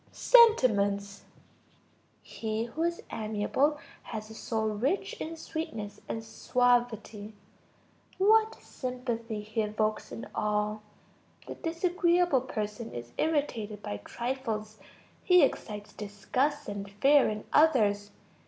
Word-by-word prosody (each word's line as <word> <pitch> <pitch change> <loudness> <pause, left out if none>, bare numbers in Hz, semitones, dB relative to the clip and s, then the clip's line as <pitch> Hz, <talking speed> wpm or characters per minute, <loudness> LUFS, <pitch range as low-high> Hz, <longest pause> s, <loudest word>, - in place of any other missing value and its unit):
Sentiments. 205 - +4 1.0
He 220 0 -3
who 240 +7 -5
is 340 0 -1
amiable 220 +7 0 0.2
has 215 -1 -7
a - - -8
soul 220 0 -2
rich 245 - -1
in 325 +1 -5
sweetness 225 -11 -5
and 225 - -3
suavity. 225 -3 0 0.8
What 440 +3 +4
sympathy 240 -4 -4
he 215 +1 -2
evokes 215 0 -1
in - - -6
all! 210 0 -1 0.6
The - - -6
disagreeable 345 -3 +2
person 220 -2 -4
is 120 0 -7
irritated 230 -10 -1
by 105 - -4
trifles. 220 - -4 0.4
He 360 -3 +6
excites 210 -6 -2
disgust 250 +8 -2
and 200 -1 -5
fear 275 +8 +4
in 215 0 -4
others. 210 -10 +4
225 Hz, 105 wpm, -29 LUFS, 210-290 Hz, 1.0 s, He